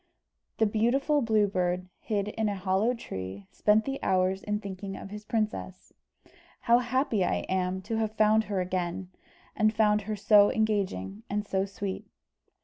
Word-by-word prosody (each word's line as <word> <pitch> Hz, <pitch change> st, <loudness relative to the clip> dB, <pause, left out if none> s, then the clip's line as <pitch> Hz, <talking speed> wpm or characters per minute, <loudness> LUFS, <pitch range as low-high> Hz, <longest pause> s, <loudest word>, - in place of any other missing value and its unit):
The 220 Hz, -, +3 dB
beautiful 250 Hz, +8 st, +2 dB
Blue 220 Hz, -3 st, +3 dB
Bird, 180 Hz, -2 st, -1 dB
hid 205 Hz, -1 st, -2 dB
in 220 Hz, 0 st, -1 dB
a 205 Hz, -, -2 dB
hollow 195 Hz, +5 st, +1 dB
tree, 95 Hz, -, -7 dB
spent 215 Hz, +1 st, +3 dB
the 270 Hz, 0 st, -4 dB
hours 185 Hz, +1 st, +1 dB
in 210 Hz, 0 st, -2 dB
thinking 195 Hz, -1 st, -6 dB
of 195 Hz, -, -9 dB
his 210 Hz, 0 st, -8 dB
princess. 215 Hz, -4 st, -3 dB, 0.7 s
"How 235 Hz, 0 st, +4 dB
happy 245 Hz, -4 st, 0 dB
I -, -, -1 dB
am 185 Hz, 0 st, -1 dB
to 220 Hz, +3 st, -3 dB
have 220 Hz, -1 st, -1 dB
found 215 Hz, +1 st, +4 dB
her 200 Hz, -3 st, -1 dB
again, 180 Hz, 0 st, -3 dB, 0.4 s
and 215 Hz, -1 st, +3 dB
found 210 Hz, -1 st, +3 dB
her 215 Hz, -, 0 dB
so 205 Hz, 0 st, +5 dB
engaging 195 Hz, -, -1 dB
and 210 Hz, +1 st, -1 dB
so 190 Hz, -1 st, 0 dB
sweet." 200 Hz, -1 st, -5 dB
205 Hz, 160 wpm, -28 LUFS, 185-220 Hz, 0.7 s, so